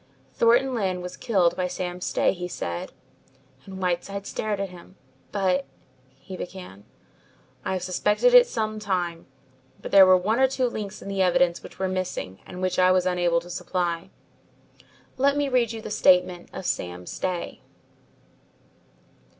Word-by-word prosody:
"Thornton 240 +3 +3
Lyne 190 -6 -1
was 180 0 -6
killed 185 -8 +2
by 180 0 -1
Sam 180 0 -5
Stay," - - +1
he 180 -1 -5
said, 85 - -5 0.8
and 190 -1 -8
Whiteside 190 +2 -2
stared 210 -1 -3
at 195 -2 -3
him. 180 +1 -14 0.4
"But 185 -2 +1 0.3
" 130 +1 -34
he 190 - -6
began. 180 - -9 0.8
"I - - -2
have 185 -1 -3
suspected 210 - +2
it - - +9
for - - -13
some 215 -1 -2
time, 180 -5 -2 0.5
but - - -8
there 195 -1 +8
were 185 0 +7
one 215 +7 0
or 265 - +6
two 260 -1 -1
links 215 -5 -5
in - - -9
the 195 -1 -1
evidence 180 -1 +3
which - - -12
were 190 - -1
missing 185 - -4
and 180 +1 -7
which 185 0 0
I 185 0 +5
was 185 -1 +3
unable 175 -2 +1
to 175 - -13
supply. 175 -1 -2 1.1
Let 280 +2 +3
me 290 -1 +1
read 245 -3 +2
you 225 -1 -7
the 215 - -6
statement 180 -2 +3
of 190 - -7
Sam 90 - -3
Stay." 180 - -4
185 Hz, 165 wpm, -25 LUFS, 180-210 Hz, 1.1 s, it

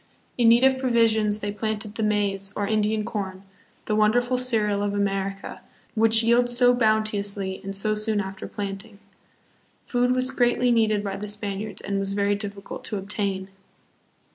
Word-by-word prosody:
In 235 -2 +4
need 235 +2 +5
of 265 0 +4
provisions, 220 -4 +2
they 205 - -2
planted 215 0 -4
the 225 - -5
maize, 200 -2 0
or 205 - -1
Indian 215 0 0
corn, 195 -4 -5 0.4
the 215 - 0
wonderful 245 +4 +2
cereal 220 -5 0
of 205 0 -1
America, 195 -1 -3 0.3
which 225 0 +4
yields 240 +1 +3
so 245 -1 +5
bounteously, 210 -4 0
and 195 0 -5
so 215 +2 +3
soon 215 0 +1
after 190 -1 -5
planting. 200 +1 -6 0.9
Food 245 0 +1
was 255 +1 +1
greatly 245 -1 +2
needed 215 -3 +2
by 195 -1 -4
the 210 +1 -6
Spaniards 205 0 -4
and 200 -1 -2
was 195 0 -2
very 200 0 +1
difficult 200 -1 -6
to 210 - -2
obtain. 195 -1 -3
210 Hz, 160 wpm, -24 LUFS, 200-230 Hz, 0.9 s, need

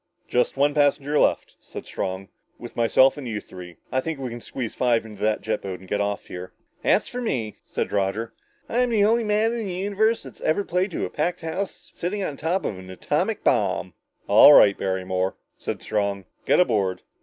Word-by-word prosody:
"Just 125 +2 +1
one 145 +1 +3
passenger 145 0 +2
left," - - +1
said - - -9
Strong, 95 +1 -4 0.3
"with 120 - -10
myself 130 +4 +4
and 140 -4 -6
you 110 -2 -3
three. 90 -3 -11 0.2
I 130 - +1
think 160 +1 -4
we 130 -3 -5
can 120 0 -7
squeeze 120 -2 -5
five 120 -3 +1
in 110 -1 -10
that 105 +2 0
jet 110 -1 -2
boat 95 -2 -5
and 95 - -14
get 105 +2 -1
off 100 -1 -2
here." 90 0 -8 0.3
"That's - - +2
for 250 - -5
me," 115 - -2
said - - -3
Roger. 105 +3 -1 0.3
"I'm 245 +1 +1
the 215 -3 +3
only 230 +2 +3
man 215 +1 +2
in 235 - -3
the 185 - -4
whole 185 - -3
universe 215 +3 +1
that's - - -12
ever 160 +6 +1
played 180 +2 0
to 175 - -3
a - - -7
packed 175 +4 -1
house 180 +4 -5
sitting 195 +4 -3
on 150 - -3
top 165 +7 -1
of 95 - -3
an 95 0 -11
atomic 95 - -1
bomb!" - - +1 0.3
"All - - +9
right, 100 - +7
Barrymore," 95 0 -1 0.2
said - - -5
Strong, 100 -2 -1 0.2
"get - - +4
aboard!" 100 - +1
125 Hz, 205 wpm, -24 LUFS, -, 0.3 s, All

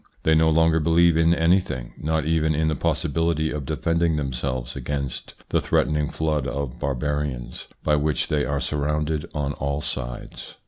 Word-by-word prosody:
They 80 - +4
no 80 0 +4
longer 80 0 +4
believe 85 +1 +4
in 80 +1 +4
anything, 80 -8 +1
not 80 -1 0
even 80 -1 +2
in 80 +1 +1
the 80 - 0
possibility 80 +3 0
of 75 -3 -4
defending 85 +1 +1
themselves 65 -2 -3
against 70 0 -4
the - - +2
threatening 75 -1 +1
flood 75 -3 -1
of 70 -3 -4
barbarians, 70 -2 -3 0.2
by 75 -1 +3
which 75 +1 0
they 75 -1 +1
are 70 -1 -1
surrounded 75 +1 -1
on 70 -1 -1
all 70 +1 -2
sides. - - -6
75 Hz, 155 wpm, -24 LUFS, 70-80 Hz, 0.2 s, They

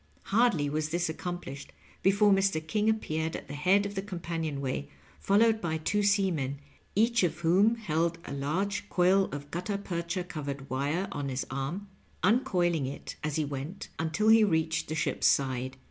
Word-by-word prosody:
Hardly 210 -10 +3
was 155 +1 -1
this 175 +1 0
accomplished 160 -4 -6 0.3
before 200 +2 +4
Mr. 195 -3 +3
King 210 +5 +1
appeared 160 -7 -1
at - - -7
the 140 - -7
head 185 +7 +3
of 200 - -4
the 195 - -2
companion 170 -6 -4
way, 130 - -3 0.3
fol 200 - +2
lowed 225 0 +4
by 160 -2 -1
two 205 +6 0
seamen, 185 -10 +1 0.4
each 230 +3 +3
of 170 -2 0
whom 190 +7 +4
held 170 -6 0
a - - -6
large 175 +9 -2
coil 190 +2 +4
of 145 -2 -7
guttarpercha 180 -1 -3
covered 140 -4 -5
wire 145 +8 0
on 145 -6 -3
his 130 0 -2
arm, 140 +10 -3 0.4
uncoiling 180 - +2
it 140 - -7
as 150 -1 -1
he 155 - +1
went, 145 +6 -6
until 165 +7 +1
he 225 0 +7
reached 160 -4 +1
the 155 - -3
ship's 155 - +1
side. 130 -1 +1
170 Hz, 170 wpm, -29 LUFS, 145-200 Hz, 0.4 s, he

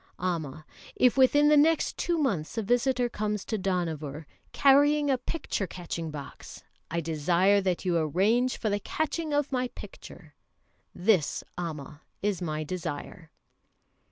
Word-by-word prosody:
Amma, 155 -5 -3 0.3
if 250 -1 +4
within 290 +3 +5
the 300 - +6
next 310 +2 +3
two 345 -1 -1
months 230 - -1
a 225 - 0
visitor 245 +3 +1
comes 210 -3 -3
to 220 - -2
Dohnavur 165 -6 -3 0.3
carrying 285 +1 +4
a 265 - +2
picture 245 - -3
catching 170 -2 -5
box, 150 -2 -9 0.3
I 170 +1 -1
desire 170 +6 +2
that 185 -1 -1
you 180 -2 +1
arrange 205 - +1
for 215 - -1
the 205 - 0
catching 315 +5 -3
of 290 -1 0
my 255 -1 0
picture. - - -12 0.6
This, 180 -4 +1
Amma, 155 -4 -6 0.2
is 205 -3 0
my 155 -3 -2
desire." 160 0 -6
195 Hz, 140 wpm, -28 LUFS, 165-255 Hz, 0.6 s, the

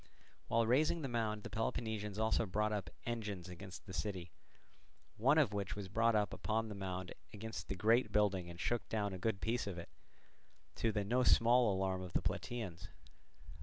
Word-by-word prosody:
While 115 0 +3
raising 150 +7 +3
the - - -1
mound 110 -4 -1
the - - -6
Peloponnesians 110 -2 -2
also 110 0 +2
brought 105 +3 +1
up 100 -6 -2 0.2
engines 105 -6 -3
against 90 +1 -9
the 95 - -8
city, 95 -4 -3 0.8
one 135 +8 +4
of 140 -10 +4
which 100 0 -2
was 100 -2 -6
brought 115 +3 +3
up 105 -1 +2
upon 110 0 -1
the - - -4
mound 95 -2 -4 0.2
against 110 +1 -6
the 95 - -2
great 110 +4 +3
building 100 -4 +2
and 85 0 -9
shook 120 0 -1
down 105 -3 0
a 95 - -5
good 100 0 -1
piece 115 0 0
of 95 -3 -4
it, 85 - -7 0.9
to 115 - +2
the 105 -1 0
no 125 +5 +2
small 120 -1 +5
alarm 95 -1 0
of 90 -1 -7
the - - +2
Plataeans. 110 -9 -3
105 Hz, 185 wpm, -37 LUFS, 95-115 Hz, 0.9 s, small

